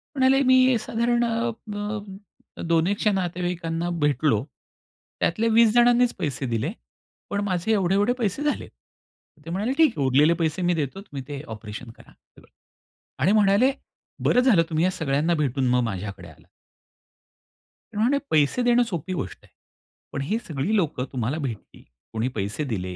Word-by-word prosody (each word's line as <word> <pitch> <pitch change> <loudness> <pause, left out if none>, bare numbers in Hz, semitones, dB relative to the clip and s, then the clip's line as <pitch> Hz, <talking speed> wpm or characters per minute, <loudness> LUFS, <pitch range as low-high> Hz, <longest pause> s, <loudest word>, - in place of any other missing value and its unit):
म्हणाले, 265 0 +4
मी 255 -1 +5
साधारण 235 +2 0
अ, 230 0 0 1.1
अ, - - -6
दोन 165 +1 +3
एकशे 205 +1 +1
नातेवाईकांना 175 -2 -2
भेटलो 145 -6 +2 0.8
त्यातले 220 +7 +1
20 225 0 +5
जणांनीच 240 0 +4
पैसे 140 -5 -2
दिले. 115 -3 -1 0.6
पण 205 - -1
माझे 185 +1 -1
एवढे-एवढे 200 +3 +2
पैसे 230 +3 -1
झाले. 295 - -1 0.8
ते 165 - -7
म्हणाले, 205 +8 -1
"ठीक 320 -6 +5
आहे, 140 - +1
उरलेले 145 +5 +4
पैसे 160 +3 0
मी 175 0 +2
देतो, 155 +4 -3
तुम्ही 145 -10 -8
ते 145 -1 -6
ऑपरेशन 110 +2 -8
करा - - -19
सगळं" - - -24 0.7
आणि 180 - +4
म्हणाले, 210 +4 +4 0.5
"बरं 245 - +4
झालं, 235 -10 +5
तुम्ही 160 0 +1
या 185 - +2
सगळ्यांना 160 -2 0
भेटून 135 -4 0
मग 125 0 +3
माझ्याकडे 100 -4 -5
आलात." 80 - -18 1.5
ते - - -7
म्हणाले, 245 +7 +3
"पैसे 155 - +3
देणं 245 0 +4
सोपी 185 - -4
गोष्ट 100 - -5
आहे." - - -25 0.6
पण 140 - -2
ही 205 +11 -1
सगळी 160 +7 -1
लोकं 155 -10 0
तुम्हाला 130 +3 -2
भेटली. 130 -8 -6 0.3
कोणी 110 +2 -1
पैसे 105 +7 -2
दिले, 90 -3 -3
175 Hz, 155 wpm, -24 LUFS, 135-225 Hz, 1.5 s, मी